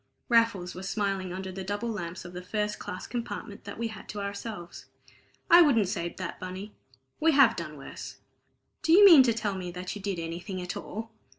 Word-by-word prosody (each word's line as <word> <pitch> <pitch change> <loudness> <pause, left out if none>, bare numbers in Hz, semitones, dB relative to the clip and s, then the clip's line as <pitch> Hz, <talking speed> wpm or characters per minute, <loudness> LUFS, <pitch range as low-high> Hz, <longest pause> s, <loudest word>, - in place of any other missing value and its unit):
Raffles 230 -7 +3
was 190 +1 -6
smiling 195 -3 -1
under 190 +1 -5
the 190 +1 -6
double 205 +5 -3
lamps 175 -4 -5
of 175 - -9
the 180 - -6
first 210 +3 -2
class 180 - -6
compartment 235 -4 -6
that 200 - -7
we 230 0 -2
had 220 - -10
to 210 - -5
ourselves. 200 -3 -6 0.6
"I 345 - +9
wouldn't 235 - +4
say 170 -4 -2
that, 185 0 -6
Bunny. 185 +3 -7 0.5
We 320 0 +4
have 275 -1 +6
done 155 -3 -6
worse." 135 - -8 0.7
"Do 325 - +3
you 405 +3 +9
mean 335 -8 +10
to 250 -2 +4
tell 215 -3 -1
me 185 -2 -5
that 180 +2 -5
you 205 - -7
did 195 -2 -2
anything 170 +3 -5
at 180 0 -4
all?" 225 +1 -6
200 Hz, 200 wpm, -28 LUFS, 180-225 Hz, 0.7 s, mean